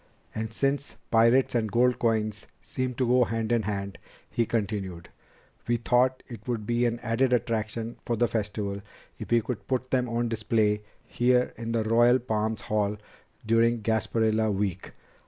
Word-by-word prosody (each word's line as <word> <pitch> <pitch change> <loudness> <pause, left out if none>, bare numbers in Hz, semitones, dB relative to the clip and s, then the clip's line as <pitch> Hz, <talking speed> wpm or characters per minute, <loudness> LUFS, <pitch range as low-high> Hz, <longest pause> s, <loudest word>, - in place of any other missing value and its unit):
"And 110 0 -4
since 140 +5 -1 0.2
pirates 115 +3 +4
and 115 -2 +1
old - - -11
gold 125 +1 +3
coins 110 -3 0
seem 130 -1 -4
to 130 - 0
go 125 +1 +4
hand 115 0 -2
in 120 -1 +3
hand," 100 -2 -4 0.3
he 115 -2 0
continued, 100 -6 -3 0.6
"we 120 0 +2
thought 125 +2 +2
it 115 -2 -10
would 115 -4 -2
be 120 +2 +1
an 120 0 -2
added 120 +3 +1
attraction 115 0 -1
for 120 - -1
the 120 +2 +2
Festival 105 -2 -3 0.4
if - - -7
we 120 0 +4
could 115 0 -5
put 130 -1 -2
them 125 -2 +1
on 120 +1 0
display 110 -2 +1 0.2
here 125 +1 +2
in 115 0 -5
the 115 -1 +1
Royal 120 +3 +5
Palms 110 -3 -2
Hall 105 -1 -1 0.5
during 115 0 +2
Gasparilla 110 0 +1
Week. 95 -2 -2
115 Hz, 165 wpm, -27 LUFS, 110-120 Hz, 0.6 s, Royal